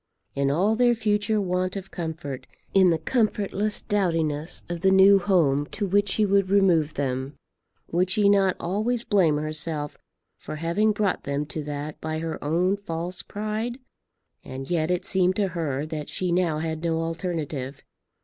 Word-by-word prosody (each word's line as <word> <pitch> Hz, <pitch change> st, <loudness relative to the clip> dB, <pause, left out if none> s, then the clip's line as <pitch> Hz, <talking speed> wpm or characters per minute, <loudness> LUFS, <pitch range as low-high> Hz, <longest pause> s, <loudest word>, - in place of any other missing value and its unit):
In 140 Hz, 0 st, +1 dB
all 190 Hz, +10 st, +2 dB
their 240 Hz, 0 st, +4 dB
future 215 Hz, -1 st, +1 dB
want 185 Hz, -1 st, -1 dB
of 195 Hz, -1 st, -7 dB
comfort, 160 Hz, -6 st, -5 dB, 0.3 s
in 190 Hz, -2 st, +6 dB
the 165 Hz, -, +2 dB
comfortless 210 Hz, +1 st, 0 dB
dowdiness 165 Hz, -6 st, -1 dB
of 175 Hz, -1 st, -5 dB
the 190 Hz, -, +4 dB
new 190 Hz, +1 st, +7 dB
home 155 Hz, -7 st, +2 dB
to 205 Hz, -, -2 dB
which 200 Hz, +1 st, +2 dB
she 215 Hz, +3 st, +2 dB
would 200 Hz, -1 st, +2 dB
remove 175 Hz, -6 st, +3 dB
them, 135 Hz, 0 st, -2 dB, 0.6 s
would 180 Hz, +2 st, +1 dB
she 200 Hz, +2 st, +3 dB
not 195 Hz, -2 st, +4 dB
always 220 Hz, +7 st, -1 dB
blame 175 Hz, -10 st, +3 dB
herself 155 Hz, 0 st, -3 dB, 0.4 s
for -, -, -7 dB
having 170 Hz, +8 st, +1 dB
brought 205 Hz, -3 st, -1 dB
them 140 Hz, +1 st, -1 dB
to 150 Hz, +1 st, -5 dB
that 145 Hz, +1 st, -5 dB
by 155 Hz, 0 st, -3 dB
her 160 Hz, 0 st, -4 dB
own 175 Hz, +6 st, +1 dB
false 175 Hz, -1 st, -5 dB
pride? 215 Hz, +3 st, -4 dB, 0.7 s
And 135 Hz, +3 st, -7 dB
yet 160 Hz, -2 st, +1 dB
it 180 Hz, -1 st, 0 dB
seemed 185 Hz, -1 st, +2 dB
to 200 Hz, -1 st, +1 dB
her 155 Hz, -5 st, -2 dB
that 155 Hz, -2 st, -5 dB
she 180 Hz, -1 st, -1 dB
now 170 Hz, -3 st, +1 dB
had 160 Hz, 0 st, -3 dB
no 165 Hz, -1 st, 0 dB
alternative. 160 Hz, -5 st, -4 dB
175 Hz, 165 wpm, -25 LUFS, 155-200 Hz, 0.7 s, new